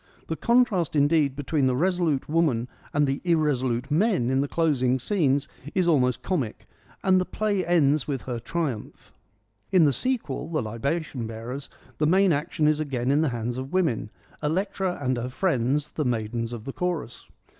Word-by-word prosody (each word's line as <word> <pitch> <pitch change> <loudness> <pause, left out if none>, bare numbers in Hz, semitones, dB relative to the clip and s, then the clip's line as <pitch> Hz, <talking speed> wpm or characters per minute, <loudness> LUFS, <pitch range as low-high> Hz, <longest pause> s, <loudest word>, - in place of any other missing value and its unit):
The 160 - -1
contrast, 230 - +2
indeed, 145 -1 +3
between 145 0 0
the 130 - +1
resolute 170 -2 +1
woman 150 -7 +1 0.2
and 145 0 +2
the 135 0 -1
irresolute 135 -6 +1
men 165 - +2
in 135 +1 +2
the 140 - -1
closing 135 -6 +1
scenes 140 - +1 0.3
is 185 -2 +2
almost 130 -7 +2
comic, 140 - -2 0.4
and 185 -1 +4
the - - +2
play 205 0 -1
ends 155 -5 +2
with 135 -4 -3
her 120 -2 -4
triumph. 135 -3 -4 0.6
In 180 -4 +6
the 140 - +3
sequel, 165 - -2
The 155 -6 -1
Libation 125 +3 -3
Bearers, 120 +5 -6 0.3
the 150 - +3
main 190 +1 +4
action 150 +1 0
is 155 0 +2
again 135 -4 -1
in 145 +2 +3
the 160 - +2
hands 120 +1 -3
of 130 +4 -7
women, 160 -13 +1 0.3
Electra 185 +3 -1
and 130 -3 0
her 120 +1 -3
friends, 140 -2 0
the 155 - -2
maidens 115 -1 -2
of 115 -3 -7
the 135 - -5
chorus. 175 -9 -3
145 Hz, 170 wpm, -26 LUFS, 125-170 Hz, 0.6 s, In